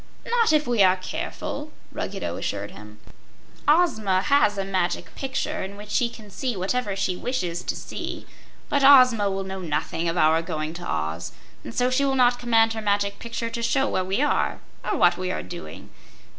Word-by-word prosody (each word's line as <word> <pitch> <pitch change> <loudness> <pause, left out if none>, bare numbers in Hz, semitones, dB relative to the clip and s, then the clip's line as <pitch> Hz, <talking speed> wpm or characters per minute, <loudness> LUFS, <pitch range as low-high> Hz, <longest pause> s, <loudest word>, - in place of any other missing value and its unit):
"Not 470 -4 +2
if 305 -1 +3
we 240 -4 +2
are 185 -1 +6
careful," 185 - -5 0.2
Ruggedo 85 0 -4
assured 100 +2 -4
him. 105 +1 -12 0.7
"Ozma 220 - +3
has 245 -7 +3
a 195 - -1
Magic 185 -2 -1
Picture, 275 +3 -3
in 195 +1 -6
which 210 0 -10
she 235 +2 +2
can 215 -3 -13
see 245 +1 -3
whatever 200 +2 -1
she 190 -1 -1
wishes 180 -6 -2
to - - -3
see; - - -6 0.4
but 285 -1 +1
Ozma 255 -7 +7
will 195 0 -2
know 190 0 -6
nothing 165 +1 -2
of 165 - -2
our 160 0 +4
going 155 -1 -4
to 175 +1 -7
Oz, 80 +2 -3 0.3
and 115 - -8
so 250 +1 +2
she 270 +2 +2
will 270 -1 +1
not 245 -1 +4
command 225 -2 +3
her 220 - -4
Magic 200 -1 0
Picture 230 0 -4
to 235 - -4
show 270 +4 +2
where 185 - 0
we 195 +9 0
are 295 - +1 0.2
or - - -1
what 175 0 +4
we 185 0 -2
are - - -3
doing. 125 - -9
200 Hz, 190 wpm, -24 LUFS, 180-250 Hz, 0.7 s, Ozma